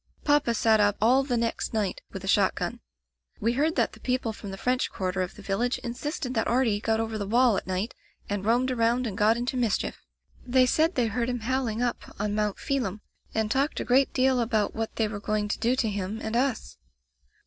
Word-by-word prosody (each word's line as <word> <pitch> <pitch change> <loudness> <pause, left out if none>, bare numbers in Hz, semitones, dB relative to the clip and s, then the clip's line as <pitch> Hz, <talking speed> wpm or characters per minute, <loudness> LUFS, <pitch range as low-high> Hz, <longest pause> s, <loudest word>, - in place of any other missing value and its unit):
Papa 290 -5 +3
sat 220 -1 +4
up 205 0 +3
all 245 +5 +5
the 260 -3 -1
next 230 0 -2
night 210 -3 -1
with 195 - -7
a - - -6
shot 195 -1 +3
gun. - - -3 0.6
Wc 230 +2 +1
heard 310 +6 +1
that - - +1
the - - -13
people 250 -3 -1
from 205 -1 -8
the 195 - -6
French 250 +4 0
quarter 185 0 -2
of 180 - -4
the 205 - -12
village 225 +6 0
insisted 255 +2 -4
that 225 -2 0
Artie 235 -4 +2
got 220 0 0
over 225 -1 -2
the 200 - -3
wall 240 +1 +4
at - - -3
night 190 +5 -2 0.3
and 200 -1 -2
roamed 245 +4 +2
around 240 +1 +1
and 210 -5 -3
got 215 +3 +3
into 245 +2 -2
mischief. 235 -5 -1 0.4
They 255 0 +4
said 315 +7 +2
they 245 - +2
heard 235 +2 -1
him 245 -2 -2
howling 245 -1 -1
up 245 - -3
on 205 0 -1
Mount 210 -1 0
Phelim, 220 -7 -2 0.3
and 220 -1 0
talked 275 +4 +1
a - - -3
great 265 +2 +3
deal 260 -1 +2
about 220 -3 +1
what 225 0 -4
they 220 - +1
were 210 -1 -5
going 210 0 -1
to - - -2
do 240 +3 +2
to 250 -3 0
him 205 +1 -3
and 220 0 -4
us. 250 - -1
230 Hz, 225 wpm, -27 LUFS, 210-250 Hz, 0.6 s, all